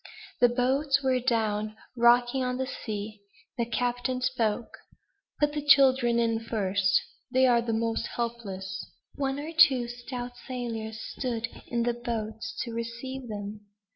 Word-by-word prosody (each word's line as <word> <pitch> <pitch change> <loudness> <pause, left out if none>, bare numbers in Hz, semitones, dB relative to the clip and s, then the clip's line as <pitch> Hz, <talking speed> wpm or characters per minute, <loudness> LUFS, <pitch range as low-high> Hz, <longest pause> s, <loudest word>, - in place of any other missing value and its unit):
The 245 - +6
boats 270 +3 +2
were 260 -1 +3
down, 215 -3 0 0.2
rocking 240 +2 +4
on 250 0 -1
the 260 - -1
sea. 215 -4 -5 0.4
The 235 - +1
captain 245 +2 -1
spoke: 240 -3 -1 0.6
"Put 295 0 +2
the 295 - -2
children 265 -4 +5
in 230 -1 +2
first; 200 -4 +1 0.3
they 260 +1 +4
are 240 -2 +5
the 235 -1 -2
most 225 0 0
helpless." 195 -5 -4 0.3
One 275 -1 -2
or 305 +3 -5
two 270 -7 +6
stout 245 +1 -6 0.2
sailors 225 -4 -4
stood 230 -1 -3 0.2
in 235 -1 0
the 240 0 +1
boats 225 -2 -4
to 235 - -6
receive 235 +3 -5
them. 205 -1 -6
240 Hz, 140 wpm, -28 LUFS, 225-255 Hz, 0.6 s, The